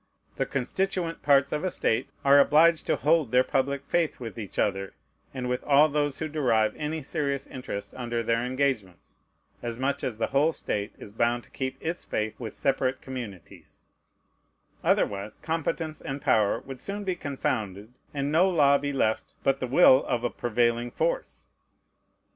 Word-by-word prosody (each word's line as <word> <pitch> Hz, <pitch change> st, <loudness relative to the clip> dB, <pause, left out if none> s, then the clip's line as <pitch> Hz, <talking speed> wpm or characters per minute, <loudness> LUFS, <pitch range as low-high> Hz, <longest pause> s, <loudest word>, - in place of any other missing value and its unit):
The -, -, 0 dB
constituent 170 Hz, +5 st, -2 dB
parts 140 Hz, -1 st, +4 dB
of 150 Hz, -, -2 dB
a 185 Hz, -, +1 dB
state 115 Hz, -7 st, 0 dB, 0.2 s
are 140 Hz, +1 st, +7 dB
obliged 160 Hz, +3 st, +5 dB
to -, -, +3 dB
hold 155 Hz, -4 st, +2 dB
their 125 Hz, 0 st, +5 dB
public 140 Hz, +2 st, -1 dB
faith 170 Hz, -1 st, 0 dB
with 115 Hz, -2 st, -7 dB
each 105 Hz, -4 st, -7 dB
other, 95 Hz, -1 st, -1 dB, 0.4 s
and 130 Hz, -2 st, -4 dB
with 125 Hz, 0 st, -2 dB
all 145 Hz, +2 st, +5 dB
those 145 Hz, -1 st, 0 dB
who 160 Hz, -, -3 dB
derive 125 Hz, -8 st, +1 dB
any 155 Hz, 0 st, -3 dB
serious 140 Hz, -2 st, -2 dB
interest 125 Hz, -6 st, -6 dB
under 120 Hz, -2 st, -2 dB
their 115 Hz, +1 st, +1 dB
engagements, 125 Hz, -8 st, -2 dB, 0.4 s
as 120 Hz, -1 st, -4 dB
much 135 Hz, +2 st, -1 dB
as 115 Hz, -4 st, -2 dB
the 115 Hz, -, +1 dB
whole 150 Hz, +4 st, +3 dB
state 105 Hz, -6 st, -3 dB
is 100 Hz, -, -11 dB
bound 120 Hz, +2 st, +1 dB
to -, -, -20 dB
keep 130 Hz, 0 st, -4 dB
its 170 Hz, +2 st, -4 dB
faith 110 Hz, 0 st, -2 dB
with 115 Hz, -4 st, -6 dB
separate 135 Hz, -1 st, 0 dB
communities: 120 Hz, -9 st, -9 dB, 1.0 s
otherwise, 100 Hz, +1 st, 0 dB
competence 160 Hz, -1 st, -3 dB
and 135 Hz, +1 st, -4 dB
power 115 Hz, -8 st, +2 dB
would 135 Hz, -1 st, -9 dB
soon 205 Hz, +6 st, -4 dB
be 185 Hz, -2 st, -1 dB
confounded, 110 Hz, -, -3 dB, 0.2 s
and 140 Hz, 0 st, -2 dB
no 175 Hz, +5 st, +4 dB
law 140 Hz, -5 st, +4 dB
be 145 Hz, 0 st, -2 dB
left 110 Hz, -5 st, -1 dB
but 135 Hz, 0 st, +2 dB
the 130 Hz, -, -2 dB
will 130 Hz, 0 st, +6 dB
of 120 Hz, -1 st, -1 dB
a 120 Hz, -, 0 dB
prevailing 120 Hz, 0 st, 0 dB
force. -, -, -2 dB
135 Hz, 170 wpm, -27 LUFS, 120-150 Hz, 1.0 s, are